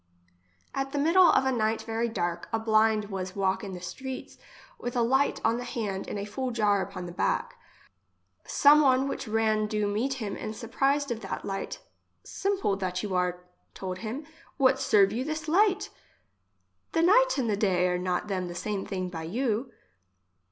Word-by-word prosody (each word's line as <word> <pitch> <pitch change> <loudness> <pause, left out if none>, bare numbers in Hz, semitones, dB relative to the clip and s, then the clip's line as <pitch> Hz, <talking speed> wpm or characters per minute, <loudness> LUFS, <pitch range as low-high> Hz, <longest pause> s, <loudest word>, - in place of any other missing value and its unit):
At 270 0 -3
the - - -1
middle 335 +5 +5
of 265 - +4
a 265 - +2
night 220 -2 0
very 230 +1 -1
dark, 175 -6 -3
a 225 - +1
blind 220 -1 +2
was 185 -1 -4
walk 195 +1 0
in 195 -2 -5
the 180 - -8
streets 260 +9 -7 0.4
with 245 +1 -4
a 240 - +3
light 265 +4 +2
on 225 +1 +3
the 245 - -4
hand 205 -6 -4
and - - -4
a 200 - -3
full 255 +5 -3
jar 210 -4 +2
upon 185 -1 -5
the 175 - -7
back. - - -1 0.8
Some 295 +1 +5
one 265 -1 +3
which 270 - -4
ran 215 -1 +1
do 210 -1 -1
meet 220 +7 0
him, 215 -6 -4
and 215 0 -5
surprised 275 +4 0
of 230 - -2
that 195 -3 -5
light: 195 0 -4 0.3
" - - -46
Simple 395 - -1
that 185 -1 -2
you 205 -3 -3
are, 180 -1 0 0.3
told 185 -1 -5
him, 235 +8 -5 0.3
what 265 -2 +4
serve 205 -7 +4
you 245 +3 -1
this 310 +2 -4
light? 390 +4 +2 1.0
The 330 - +2
night - - +5
and 255 -4 0
the 210 - +1
day 185 -3 +2
are 180 0 0
not 180 +2 -1
them 185 -3 -2
the 175 - -7
same 200 +1 -3
thing 185 -2 -3
by 170 -3 -6
you 235 +5 -1
220 Hz, 190 wpm, -28 LUFS, 195-265 Hz, 1.0 s, middle